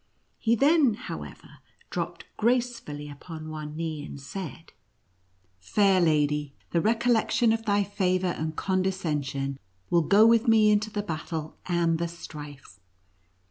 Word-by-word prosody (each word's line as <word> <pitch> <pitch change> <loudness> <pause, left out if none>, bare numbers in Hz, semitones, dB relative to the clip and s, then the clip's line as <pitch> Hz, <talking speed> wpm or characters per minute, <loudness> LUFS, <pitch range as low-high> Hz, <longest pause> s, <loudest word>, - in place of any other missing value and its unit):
He 230 0 +3
then, 280 -2 +4
how - - -6
ever, - - -12 0.3
dropped - - -4
gracefully 235 -11 -1
upon 155 +2 -8
one 155 -1 -6
knee, 160 -2 -3
and 140 - -8
said, 160 +2 -8 0.5
" 90 0 -41
Fair 190 - +3
lady, 150 -3 +1 0.2
the 170 - +2
recollection 230 +1 +2
of 225 0 -3
thy 205 0 +3
favor 185 -2 0
and 160 -3 -2
con 185 +1 0
descension 145 -7 -2 0.3
will 170 - +5
go 200 +7 +5
with 230 +1 +4
me 220 -2 +6
into 210 +1 +2
the 205 -1 -3
battle 160 -3 -5
and 170 -2 +1
the 170 - 0
strife." 145 - -10
170 Hz, 140 wpm, -27 LUFS, 150-210 Hz, 0.5 s, me